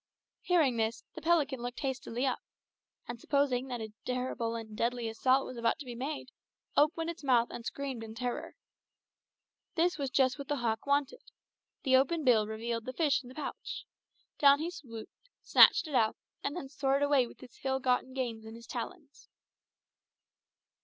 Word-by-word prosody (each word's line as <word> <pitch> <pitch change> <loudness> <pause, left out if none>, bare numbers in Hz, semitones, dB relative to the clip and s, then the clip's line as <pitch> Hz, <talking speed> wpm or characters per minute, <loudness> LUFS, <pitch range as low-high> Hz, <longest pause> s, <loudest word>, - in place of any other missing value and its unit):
Hearing 310 -9 +3
this, 225 +1 -1
the 320 - -8
pelican 295 -5 +2
looked 245 0 -5
hastily 260 -2 -2
up, 260 - 0 0.7
and 240 -1 -6
supposing 275 -3 +1
that 245 -3 -4
a 220 -1 -6
terrible 250 -2 -2
and 220 -2 -7
deadly 235 +1 0
assault 255 +4 +2
was 255 - -7
about 230 0 +1
to 290 - -8
be 245 - -6
made, 265 +2 -5 0.4
opened 325 +3 +3
its 335 - -12
mouth 245 -3 +3
and 235 - -7
screamed 265 -2 -4
in 220 0 -8
terror. 245 +1 -4 1.2
This 345 0 +2
was 275 -2 -1
just 260 +1 +2
what 280 - -6
the 290 - 0
hawk 230 -2 -1
wanted. 285 - +1 0.6
The 260 -2 +5
open 305 +5 +1
bill 225 -5 +4
revealed 230 +1 -3
the 255 - -4
fish 300 -1 +2
in 245 - -13
the 255 - -12
pouch. 305 - -5 0.5
Down 280 -1 +7
he 325 +4 -3
swooped, 230 -10 -9 0.3
snatched - - +7
it 300 - -7
out, 220 -4 +3 0.3
and 285 - -2
then 315 -6 -5
soared 275 0 +1
away 285 -4 +4
with - - -15
his 250 -2 -14
ill 265 0 +1
gotten 255 0 0
gains 235 -4 -3
in 220 0 -9
his 230 0 -11
talons. 285 +5 -7
260 Hz, 175 wpm, -32 LUFS, 235-285 Hz, 1.2 s, Down